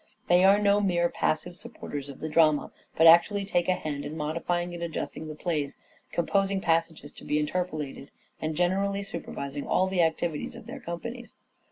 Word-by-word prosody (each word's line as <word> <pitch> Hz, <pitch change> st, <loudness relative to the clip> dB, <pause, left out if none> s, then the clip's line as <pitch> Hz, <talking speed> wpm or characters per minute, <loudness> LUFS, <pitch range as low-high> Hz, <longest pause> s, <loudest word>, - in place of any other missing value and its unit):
They 175 Hz, +1 st, +6 dB
are 195 Hz, +1 st, +7 dB
no 205 Hz, 0 st, +3 dB
mere 175 Hz, -3 st, +2 dB
passive 170 Hz, +3 st, -1 dB
supporters 175 Hz, -, -7 dB
of 140 Hz, -, -10 dB
the 155 Hz, -, -2 dB
drama, 155 Hz, -1 st, +3 dB, 0.3 s
but 160 Hz, -, +5 dB
actually 170 Hz, +5 st, +6 dB
take 175 Hz, -3 st, 0 dB
a 185 Hz, -, +4 dB
hand 150 Hz, -5 st, -4 dB
in 150 Hz, +2 st, -6 dB
modifying 170 Hz, +3 st, -2 dB
and 170 Hz, -, -7 dB
adjusting 160 Hz, -1 st, -4 dB
the 155 Hz, -, -6 dB
plays, 150 Hz, -4 st, -2 dB, 0.3 s
composing 195 Hz, +3 st, +1 dB
passages 165 Hz, -4 st, 0 dB
to -, -, -14 dB
be 150 Hz, -, 0 dB
interpolated, 150 Hz, -3 st, -3 dB, 0.3 s
and 155 Hz, 0 st, -2 dB
generally 195 Hz, +3 st, +1 dB
supervising 140 Hz, -8 st, -6 dB
all 185 Hz, -, +3 dB
the 190 Hz, -1 st, +1 dB
activities 165 Hz, +3 st, -1 dB
of 240 Hz, -1 st, -11 dB
their 260 Hz, +4 st, -8 dB
companies. 235 Hz, +4 st, -7 dB
170 Hz, 175 wpm, -27 LUFS, 155-195 Hz, 0.3 s, are